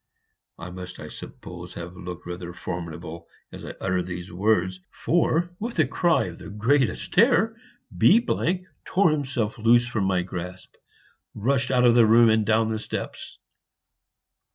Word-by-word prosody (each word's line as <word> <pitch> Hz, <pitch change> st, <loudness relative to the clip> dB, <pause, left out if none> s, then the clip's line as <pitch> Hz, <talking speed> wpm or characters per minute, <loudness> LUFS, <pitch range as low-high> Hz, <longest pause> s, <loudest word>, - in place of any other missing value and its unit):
I 85 Hz, +1 st, -8 dB
must, 90 Hz, 0 st, -9 dB
I -, -, -8 dB
suppose, -, -, -10 dB
have 85 Hz, +1 st, -7 dB
looked 90 Hz, -1 st, -8 dB
rather 90 Hz, 0 st, -6 dB
formidable 85 Hz, -2 st, -6 dB, 0.2 s
as -, -, -10 dB
I -, -, -7 dB
uttered 90 Hz, -1 st, -1 dB
these 90 Hz, 0 st, -6 dB
words, 95 Hz, -1 st, +1 dB
for, 170 Hz, +1 st, +1 dB
with 230 Hz, 0 st, -5 dB
a 155 Hz, -, +4 dB
cry 170 Hz, +5 st, +2 dB
of 85 Hz, -2 st, -7 dB
the -, -, -9 dB
greatest 120 Hz, +7 st, 0 dB
terror, 225 Hz, 0 st, +4 dB, 0.4 s
B 220 Hz, -, +6 dB, 0.6 s
tore 185 Hz, -3 st, +3 dB
himself 130 Hz, -7 st, -2 dB
loose 120 Hz, +2 st, +5 dB
from 115 Hz, -5 st, -1 dB
my 95 Hz, -2 st, +1 dB
grasp, 90 Hz, 0 st, -7 dB, 0.6 s
rushed 125 Hz, +4 st, 0 dB
out 125 Hz, -1 st, +3 dB
of 120 Hz, -, +6 dB
the 115 Hz, -2 st, +6 dB
room, 115 Hz, +1 st, +6 dB
and 110 Hz, 0 st, +3 dB
down 110 Hz, 0 st, +2 dB
the 110 Hz, -, -2 dB
steps." -, -, -6 dB
110 Hz, 155 wpm, -25 LUFS, 90-130 Hz, 0.6 s, B